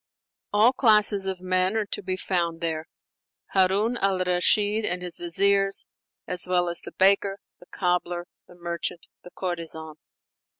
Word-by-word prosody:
All 215 +5 +4
classes 210 -5 +4
of 190 -1 -3
men 185 +3 0
are 215 - 0
to - - -4
be 185 -1 -3
found 170 -3 -2
there: 160 -1 -3 0.7
Harun 200 +5 +2
al 195 -3 +1
Rashid 205 +4 +2
and 180 -2 -2
his 180 -1 -5
viziers, 195 +3 +2 0.4
as 180 -1 -1
well 180 -1 +1
as 170 - -2
the - - -11
baker, 195 +1 +3 0.2
the 175 - -18
cobbler, 175 -1 -1 0.2
the 180 - -16
merchant, 170 -1 -5 0.2
the - - -11
courtesan. 160 -4 -5
185 Hz, 145 wpm, -25 LUFS, 175-200 Hz, 0.7 s, All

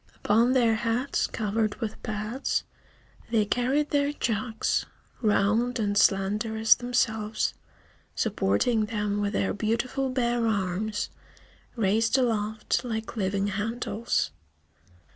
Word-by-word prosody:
Upon 230 +4 +4
their 235 -3 +4
heads, 235 +4 0
covered 215 0 -1
with 220 -3 -5
pads, 215 +5 -2 0.7
they 225 -2 +2
carried 260 +7 0
their 285 0 +2
jugs, 225 -4 -1 0.3
round 220 +3 +2
and 205 -3 0
slender 205 +3 +2
as 220 0 +7
themselves, 220 -3 0 0.6
supporting 215 - +1
them 210 -1 -1
with 205 +1 -1
their 195 - 0
beautiful 240 +6 -1
bare 240 -2 +1
arms, 205 +1 -1 0.6
raised 225 +3 +2
aloft 220 -3 0
like 225 -2 -4
living 195 -1 0
handles. 220 +3 -1
220 Hz, 105 wpm, -27 LUFS, 210-240 Hz, 0.7 s, as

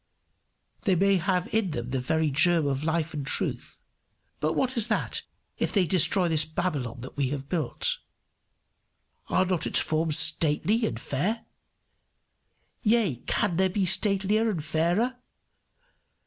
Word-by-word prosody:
They 195 -5 +2
may 195 +2 +3
have 180 +1 0
in 220 -4 +2
them 120 -5 -5
the 130 - 0
very 155 +4 0
germ 160 +2 +3
of 140 0 -1
life 160 0 -1
and 145 -2 -4
truth; - - -3 0.6
but 155 +1 0
what 260 +5 0
is 230 -2 +3
that, 220 - -1 0.4
if - - 0
they 195 -4 +2
destroy 175 +1 +4
this 160 -2 +3
Babylon 145 -7 -3
that 130 - -9
we 140 -3 0
have 140 -1 -5
built? 480 - -1 1.3
Are 185 - +2
not 180 -3 -1
its - - +3
forms 155 -1 +1
stately 205 +9 +2
and - - -5
fair? 195 - -2 1.4
Yea, 215 - +2
can 175 -5 0
there 190 0 +3
be 190 +1 0
statelier 205 +4 +2
and 170 -8 -3
fairer? 175 - 0
175 Hz, 145 wpm, -27 LUFS, 150-200 Hz, 1.4 s, destroy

